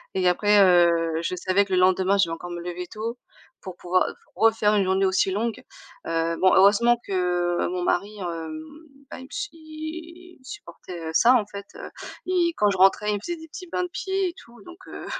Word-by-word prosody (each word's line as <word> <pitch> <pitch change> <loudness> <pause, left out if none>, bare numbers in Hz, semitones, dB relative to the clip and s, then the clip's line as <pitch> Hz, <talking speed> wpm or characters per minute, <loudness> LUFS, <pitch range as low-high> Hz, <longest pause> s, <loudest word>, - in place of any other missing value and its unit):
et 185 -1 +2
après, 205 +3 +3
heu, 170 -2 +4
je 180 - -2
savais 190 +3 +1
que 195 - -9
le 185 - +3
lendemain 185 +1 +3
je 195 - +3
vais 165 - -4
encore 175 +1 -9
me 175 0 -5
lever 180 +1 -6
tôt 230 +4 -6 0.4
pour 185 -2 -8
pouvoir 180 +1 +1 0.3
refaire 220 -2 +3
une 200 -2 +2
journée 190 +1 +2
aussi 190 0 +1
longue. 220 +4 -2 0.4
Heu, 165 0 -1
bon 185 0 +5
heureusement 215 +5 +5
que 175 -2 0
mon 180 0 -3
mari, 200 +4 -1
hem, 175 - -5 0.5
bah - - -8
il 260 - -10
me - - -14 0.2
il 330 +2 -10
supportait 180 - -9
ça 240 +10 +5
en 225 -5 +2
fait, 200 -1 -9
heu, - - -9 0.4
et 355 -2 +1
quand 210 -1 +3
je 195 - -1
rentrais, 195 +2 +4
il - - 0
me 200 - -6
faisait 345 +9 -5
des 320 - -12
petits 365 +3 -10
bains 360 - 0
de 360 - -5
pieds 385 0 -1
et 345 - -8
tout, 235 0 -16
donc 350 0 -12
heu, - - -8
200 Hz, 210 wpm, -24 LUFS, 180-245 Hz, 0.5 s, bon